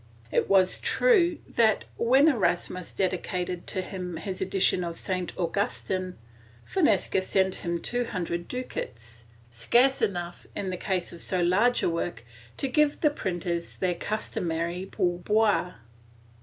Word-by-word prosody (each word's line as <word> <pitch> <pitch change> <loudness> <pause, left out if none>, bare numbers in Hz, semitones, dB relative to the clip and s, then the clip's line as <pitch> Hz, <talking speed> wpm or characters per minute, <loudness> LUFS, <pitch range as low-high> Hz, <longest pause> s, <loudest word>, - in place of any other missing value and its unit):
It - - +1
was 190 -2 +4
true 355 -9 +3
that, 220 -2 +2
when 265 +6 +4
Erasmus 185 - 0
dedicated 180 -1 -2
to 185 - 0
him 180 -3 -5
his 190 0 -5
edition 190 -1 +2
of 170 -1 -4
St, 185 0 -3
Augustin, 185 0 -2 0.5
Fonseca 205 - +2
sent 190 0 +1
him 170 0 -2
two 245 +7 -1
hundred 170 -4 -3
ducats, 115 - -6 0.3
scarce 240 - +3
enough, 175 -3 -2
in 190 -2 -3
the - - -2
case 185 -1 -2
of 170 - -9
so 185 -2 -1
large 205 +8 +3
a - - +3
work, 170 -4 -3 0.3
to 275 - -1
give 295 +2 +2
the 300 - +4
printers 175 - -3
their 185 -1 +1
customary 175 -2 -3
pour 175 -1 0
boire. 210 -1 +2
185 Hz, 140 wpm, -27 LUFS, 175-220 Hz, 0.5 s, was